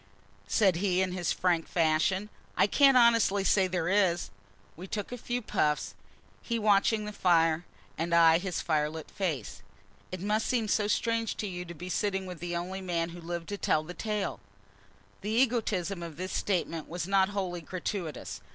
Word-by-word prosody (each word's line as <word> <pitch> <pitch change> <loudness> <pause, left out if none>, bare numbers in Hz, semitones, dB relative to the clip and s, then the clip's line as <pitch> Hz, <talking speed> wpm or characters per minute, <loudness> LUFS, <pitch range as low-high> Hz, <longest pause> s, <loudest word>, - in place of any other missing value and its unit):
said 185 - +3
he, 185 -1 +1
in 190 -1 +1
his 180 -2 -1
frank 175 -3 +1
fashion; 170 +5 +1 0.3
"I - - +5
can't 270 +5 +5
honestly 230 -5 +4
say 190 -1 +3
there 180 -2 -1
is." 185 -3 +2 0.4
We 180 +4 -9
took 205 +2 -4
a - - -3
few 245 +1 -3
puffs, 150 -7 0 0.5
he 235 - -2
watching 210 0 +3
the 210 - -6
fire, 165 -3 +2 0.3
and 165 +1 -1
I 165 -1 +6
his 180 -2 -3
firelit 155 -1 -1
face. 160 - -3 0.5
"It 185 - -4
must 210 +4 0
seem 235 -4 0
strange 225 +2 0
to - - -3
you 180 -2 -5
to 170 0 -9
be 180 +3 -8
sitting 195 +1 -1
with 180 -3 -8
the 175 +1 -4
only 185 +3 -4
man 170 -2 -1
who 175 +1 -10
lived 170 0 -5
to 205 -1 -4
tell 155 - +1
the 175 +3 -8
tale!" 210 +1 -3 0.8
The 205 - -4
egotism 220 -6 +1
of 165 -3 -7
this 185 +1 -4
speech 190 -4 0 0.2
was 175 0 -4
not 195 0 +3
wholly 185 -4 -3
gratuitous. 180 0 -5
185 Hz, 175 wpm, -29 LUFS, 170-205 Hz, 0.8 s, I